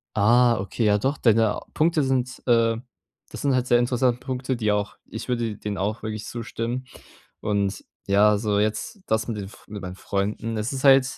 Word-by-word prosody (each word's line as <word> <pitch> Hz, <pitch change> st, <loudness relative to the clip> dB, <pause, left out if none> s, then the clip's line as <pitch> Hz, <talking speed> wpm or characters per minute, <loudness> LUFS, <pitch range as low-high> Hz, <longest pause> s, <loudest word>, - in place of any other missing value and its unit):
Ah, 120 Hz, +3 st, +5 dB
okay, 100 Hz, +4 st, -3 dB
ja 105 Hz, 0 st, +4 dB
doch, 135 Hz, +6 st, 0 dB
deine 115 Hz, -2 st, +3 dB
Punkte 155 Hz, -1 st, +2 dB
sind, 130 Hz, -1 st, -1 dB
äh 115 Hz, -1 st, +4 dB, 0.5 s
das -, -, -7 dB
sind 140 Hz, -2 st, +2 dB
halt 125 Hz, -, +1 dB
sehr 120 Hz, -1 st, +4 dB
interessante 125 Hz, 0 st, +1 dB
Punkte, 130 Hz, 0 st, -3 dB
die 110 Hz, -3 st, 0 dB
auch 105 Hz, 0 st, -1 dB
ich 110 Hz, -, -6 dB
würde 115 Hz, -4 st, -1 dB
denen 105 Hz, -2 st, -4 dB
auch 105 Hz, +4 st, -2 dB
wirklich 110 Hz, -1 st, -4 dB
zustimmen. 120 Hz, +2 st, -4 dB, 0.5 s
Und 100 Hz, -2 st, -1 dB, 0.2 s
ja, 105 Hz, +1 st, +4 dB
so 105 Hz, -1 st, 0 dB
jetzt 110 Hz, -, -1 dB
das 110 Hz, 0 st, +1 dB
mit 115 Hz, -3 st, -3 dB
den 100 Hz, -, -4 dB
F 95 Hz, -, -14 dB
mit 105 Hz, -1 st, -7 dB
meinen 90 Hz, -1 st, -6 dB
Freunden. 105 Hz, +4 st, -2 dB
Es 105 Hz, +3 st, -2 dB
ist 135 Hz, -1 st, -4 dB
halt 135 Hz, -1 st, +7 dB
115 Hz, 195 wpm, -24 LUFS, 105-125 Hz, 0.5 s, halt